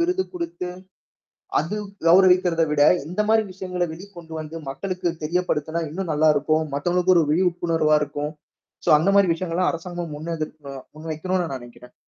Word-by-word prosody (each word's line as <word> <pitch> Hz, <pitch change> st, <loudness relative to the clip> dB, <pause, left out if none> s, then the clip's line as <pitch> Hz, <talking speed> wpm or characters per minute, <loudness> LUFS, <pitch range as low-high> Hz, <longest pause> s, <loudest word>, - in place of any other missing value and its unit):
விருது 360 Hz, +2 st, +1 dB
குடுத்து, 335 Hz, -, -4 dB, 0.9 s
அது 170 Hz, +8 st, -2 dB, 0.3 s
கௌரவிக்கிறதை 180 Hz, -2 st, +5 dB
விட 145 Hz, -1 st, +2 dB, 0.3 s
இந்த 185 Hz, +6 st, -1 dB
மாரி 220 Hz, 0 st, +4 dB
விஷயங்களை 180 Hz, -1 st, -3 dB
வெளி 180 Hz, +5 st, -10 dB
கொண்டு 165 Hz, -1 st, -10 dB
வந்து 155 Hz, +1 st, -7 dB
மக்களுக்கு 180 Hz, +5 st, -2 dB
தெரியப்படுத்தினா, 165 Hz, -1 st, -1 dB
இன்னும் 175 Hz, +2 st, -3 dB
நல்லா 155 Hz, +1 st, +4 dB
இருக்கும். 155 Hz, +2 st, +1 dB
மத்தவங்களுக்கும் 180 Hz, +5 st, +2 dB
ஒரு 165 Hz, -, +5 dB
விழிப்புணர்வா 165 Hz, -3 st, +2 dB
இருக்கும். 145 Hz, +1 st, -4 dB, 0.6 s
சோ, -, -, +5 dB
அந்த 180 Hz, +6 st, +2 dB
மாரி 200 Hz, -3 st, +5 dB
விஷயங்கள் 165 Hz, 0 st, -4 dB
எல்லாம் 185 Hz, -, +2 dB
அரசாங்கம் 175 Hz, 0 st, -5 dB
முன் 160 Hz, +3 st, -5 dB
எடுத்தோ 155 Hz, -2 st, -6 dB, 0.2 s
முன்வைக்கனும்ன்னு 160 Hz, +2 st, -2 dB
நினைக்கிறேன். 120 Hz, 0 st, -14 dB
170 Hz, 150 wpm, -23 LUFS, 155-185 Hz, 0.9 s, கௌரவிக்கிறதை